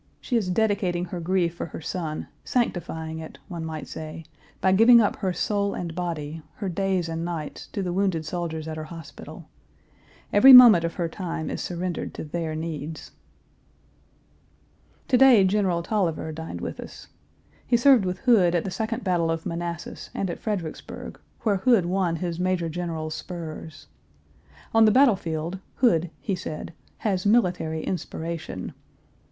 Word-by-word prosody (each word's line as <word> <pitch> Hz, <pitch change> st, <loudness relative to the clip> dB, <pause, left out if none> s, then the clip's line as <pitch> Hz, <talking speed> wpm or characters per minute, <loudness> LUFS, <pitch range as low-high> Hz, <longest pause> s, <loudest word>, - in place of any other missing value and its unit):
She 250 Hz, -, -3 dB
is 210 Hz, -6 st, +1 dB
dedicating 185 Hz, -3 st, +1 dB
her 180 Hz, 0 st, -6 dB
grief 170 Hz, 0 st, 0 dB
for 170 Hz, -, -5 dB
her -, -, -8 dB
son, 160 Hz, -1 st, -4 dB, 0.2 s
sanctifying 160 Hz, -9 st, -2 dB
it, 160 Hz, -, -9 dB
one 170 Hz, -3 st, -5 dB
might 160 Hz, -1 st, -5 dB
say, 155 Hz, +1 st, -7 dB, 0.3 s
by 190 Hz, -, +3 dB
giving 230 Hz, +5 st, +7 dB
up 210 Hz, -, +2 dB
her 190 Hz, -3 st, -1 dB
soul 200 Hz, +3 st, -1 dB
and 170 Hz, -2 st, -4 dB
body, 165 Hz, -3 st, -4 dB
her 200 Hz, -3 st, -4 dB
days 185 Hz, -1 st, 0 dB
and 165 Hz, 0 st, -3 dB
nights, 165 Hz, -4 st, -5 dB
to 200 Hz, -, -4 dB
the 180 Hz, -1 st, -2 dB
wounded 185 Hz, -4 st, 0 dB
soldiers 160 Hz, -1 st, -4 dB
at 155 Hz, 0 st, -5 dB
her 155 Hz, -, -5 dB
hospital. 165 Hz, -1 st, -10 dB, 0.9 s
Every 260 Hz, +6 st, +9 dB
moment 240 Hz, -9 st, +10 dB
of 170 Hz, -, -3 dB
her 170 Hz, -, -1 dB
time 165 Hz, -2 st, -4 dB
is -, -, -4 dB
surrendered 175 Hz, 0 st, -4 dB
to -, -, -5 dB
their 160 Hz, 0 st, -3 dB
needs. 155 Hz, -1 st, -5 dB, 2.0 s
To 250 Hz, -, +4 dB
day 260 Hz, -7 st, +7 dB
General 190 Hz, -3 st, +1 dB
Taliaferro 170 Hz, -6 st, -1 dB
dined 160 Hz, +1 st, -7 dB
with -, -, -5 dB
us. -, -, -10 dB, 0.6 s
He 240 Hz, -, +4 dB
served 255 Hz, -2 st, +6 dB
with 180 Hz, 0 st, -2 dB
Hood 200 Hz, -9 st, +4 dB
at 170 Hz, -, +1 dB
the 190 Hz, -, -4 dB
second 225 Hz, +4 st, -3 dB
battle 175 Hz, -3 st, +1 dB
of 165 Hz, 0 st, -2 dB
Manassas 170 Hz, 0 st, -5 dB
and 190 Hz, -3 st, -1 dB
at -, -, -7 dB
Fredericksburg, 190 Hz, -8 st, -5 dB, 0.2 s
where 205 Hz, -3 st, +2 dB
Hood 220 Hz, -2 st, +3 dB
won 180 Hz, -1 st, 0 dB
his 170 Hz, 0 st, -3 dB
major 180 Hz, -2 st, 0 dB
general's 160 Hz, -2 st, -4 dB
spurs. 160 Hz, -3 st, -7 dB, 0.9 s
On 225 Hz, 0 st, +6 dB
the 215 Hz, -, +6 dB
battle 255 Hz, -1 st, +6 dB
field, 165 Hz, +1 st, -4 dB, 0.2 s
Hood, 175 Hz, -9 st, +2 dB
he 200 Hz, -, -2 dB
said, 165 Hz, -3 st, -5 dB, 0.3 s
"has 190 Hz, -4 st, +1 dB
military 180 Hz, -7 st, +1 dB
inspiration." 165 Hz, -, -5 dB
175 Hz, 160 wpm, -25 LUFS, 160-195 Hz, 2.0 s, moment